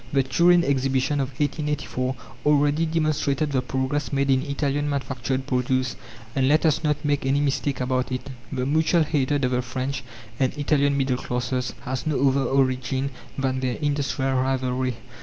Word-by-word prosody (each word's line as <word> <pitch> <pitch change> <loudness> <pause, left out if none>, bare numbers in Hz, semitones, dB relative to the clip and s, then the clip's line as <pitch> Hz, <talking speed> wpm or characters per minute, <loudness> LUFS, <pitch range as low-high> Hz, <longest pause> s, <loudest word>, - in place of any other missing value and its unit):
The 135 -1 +3
Turin 170 +6 +4
Exhibition 135 0 +1
of 135 - 0
1884 145 -3 -1 0.3
already 150 +2 +3
demonstrated 155 -2 0
the 130 -2 +1
progress 130 +1 -2
made 140 0 +1
in 130 -1 +3
Italian 145 +1 -1
manufactured 130 -1 -2
produce; 130 -2 0 0.4
and, 130 -1 +2
let 155 +4 +3
us 160 0 +2
not 150 -1 0
make 145 -1 +1
any 135 +2 +2
mistake 145 -1 0
about 130 0 -1
it, 130 +1 -3 0.2
the 130 -2 -1
mutual 160 +4 +3
hatred 145 -2 +1
of 125 - 0
the 125 0 +1
French 130 +2 -3 0.4
and 130 +1 +1
Italian 140 -1 +2
middle 135 -2 +1
classes 125 0 -2
has 130 +2 -4
no 140 -2 +3
other 135 +1 +1
origin 130 0 +1 0.3
than 130 -1 0
their 130 -1 -1
industrial 140 -2 0
rivalry. 130 -1 0
135 Hz, 160 wpm, -24 LUFS, 130-145 Hz, 0.4 s, Turin